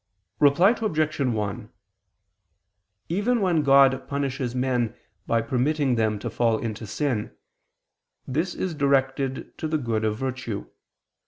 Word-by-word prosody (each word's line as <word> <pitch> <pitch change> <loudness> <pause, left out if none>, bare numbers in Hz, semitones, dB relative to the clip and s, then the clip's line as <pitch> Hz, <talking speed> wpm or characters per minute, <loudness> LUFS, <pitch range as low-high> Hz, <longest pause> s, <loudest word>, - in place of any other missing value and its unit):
Reply 150 +8 +5
Obj. 155 -8 0
1: 110 -7 -2 1.4
Even 210 +8 +1
when 180 -6 +2
God 135 -2 +5
punishes 135 -3 -2
men 125 -3 0 0.3
by 115 -1 +2
permitting 135 +2 +1
them 110 -2 +1
to 115 +3 -5
fall 115 -1 +2
into 110 -1 -5
sin, 120 -1 -2 0.9
this 160 +7 -1
is 185 -3 -2
directed 135 -2 0
to 160 - -2
the 155 0 0
good 115 -5 -1
of 110 -1 0
virtue. 125 -4 -4
135 Hz, 120 wpm, -25 LUFS, 115-150 Hz, 1.4 s, Reply